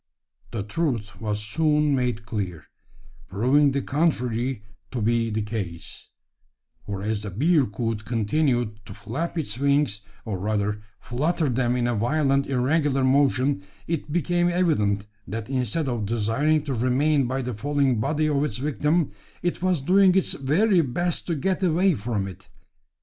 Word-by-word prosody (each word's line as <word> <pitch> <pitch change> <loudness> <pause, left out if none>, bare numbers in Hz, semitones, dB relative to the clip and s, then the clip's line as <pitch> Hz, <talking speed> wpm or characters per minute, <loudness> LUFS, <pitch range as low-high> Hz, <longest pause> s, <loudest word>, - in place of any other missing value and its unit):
The 110 -4 -3
truth 110 -4 -2
was 105 -1 -2
soon 150 +4 +2
made 125 -4 -1
clear 95 -8 -4 0.6
proving 130 +9 +3
the 140 0 -1
contrary 125 -6 0 0.3
to 125 - -4
be 115 +1 +1
the 110 0 -1
case: 95 -6 -6 0.7
for 100 -1 -5
as 105 0 -1
the 105 - -5
bearcoot 115 - +1
continued 120 -1 0
to 100 - -9
flap 165 +9 -4
its 125 -7 -2
wings, 140 -6 +2 0.3
or 105 -5 -3
rather, 105 +1 -1 0.2
flutter 155 +5 0
them 125 0 +1
in 125 -1 0
a 120 - +1
violent 135 +4 +1
irregular 135 +1 +1
motion, 135 -2 +3 0.2
it 160 -2 -3
became 175 +2 +1
evident 125 - +1 0.2
that 110 +2 -5
instead 130 +4 -1
of 115 -5 -2
desiring 120 +8 +1
to 145 -3 -3
remain 130 +3 +2
by 130 +1 -2
the 125 0 -3
fallen 135 +1 +1
body 150 +6 +1
of 145 -1 +1
its 115 -8 -2
victim, 150 +3 0 0.3
it 175 0 -1
was 180 -5 +1
doing 185 +5 +5
its 190 - +2
very 170 +8 +3
best 170 +5 -1
to 170 - 0
get 185 +6 -1
away 180 +1 +3
from 105 -5 -2
it! 95 - -11
130 Hz, 150 wpm, -25 LUFS, 110-150 Hz, 0.7 s, doing